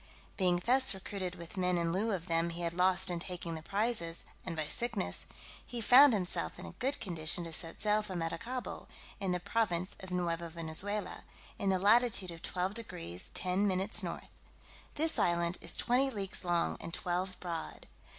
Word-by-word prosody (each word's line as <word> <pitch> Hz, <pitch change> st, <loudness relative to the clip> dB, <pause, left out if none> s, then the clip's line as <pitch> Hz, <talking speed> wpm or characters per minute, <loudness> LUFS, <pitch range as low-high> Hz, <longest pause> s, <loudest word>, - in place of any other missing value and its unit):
Being 180 Hz, -2 st, +3 dB
thus 255 Hz, -4 st, +5 dB
recruited 190 Hz, -1 st, -5 dB
with 170 Hz, +2 st, -10 dB
men 180 Hz, -1 st, +2 dB
in 170 Hz, -1 st, 0 dB
lieu 215 Hz, +5 st, +1 dB
of 180 Hz, -4 st, -2 dB
them 165 Hz, 0 st, +1 dB
he 170 Hz, +1 st, -5 dB
had 170 Hz, -1 st, -1 dB
lost 185 Hz, +1 st, +3 dB
in 175 Hz, -, -2 dB
taking 175 Hz, -1 st, -4 dB
the 160 Hz, -, -5 dB
prizes, 195 Hz, -3 st, 0 dB, 0.2 s
and 170 Hz, -3 st, -4 dB
by 155 Hz, -, -1 dB
sickness, 230 Hz, +3 st, -2 dB, 0.4 s
he 240 Hz, -, -5 dB
found 250 Hz, +4 st, +8 dB
himself 185 Hz, -4 st, -1 dB
in -, -, -8 dB
a -, -, -7 dB
good 270 Hz, +3 st, -2 dB
condition 170 Hz, -3 st, -1 dB
to 165 Hz, -1 st, -6 dB
set 165 Hz, +1 st, -5 dB
sail 210 Hz, 0 st, +3 dB
for 205 Hz, -3 st, -6 dB
Maracaibo, 175 Hz, +10 st, -4 dB, 0.3 s
in 195 Hz, -3 st, -1 dB
the 180 Hz, -, 0 dB
province 185 Hz, -2 st, 0 dB
of 190 Hz, -, -9 dB
Neuva 170 Hz, -2 st, -1 dB
Venezuela, 170 Hz, +5 st, -1 dB, 0.4 s
in 195 Hz, -, +1 dB
the 190 Hz, -, +3 dB
latitude 205 Hz, -1 st, +4 dB
of 165 Hz, -1 st, -10 dB
12 185 Hz, +2 st, -2 dB
deg. 90 Hz, -, -5 dB
10 185 Hz, +3 st, +1 dB
min. 190 Hz, 0 st, +1 dB
north. -, -, -5 dB, 0.7 s
This 320 Hz, +2 st, +3 dB
island 170 Hz, 0 st, +2 dB
is 170 Hz, -, -1 dB
twenty 255 Hz, +3 st, +2 dB
leagues 200 Hz, -7 st, -2 dB
long, 175 Hz, -1 st, +1 dB
and -, -, -6 dB
twelve 180 Hz, +1 st, -2 dB
broad. 170 Hz, -3 st, -5 dB
185 Hz, 180 wpm, -33 LUFS, 170-210 Hz, 0.7 s, found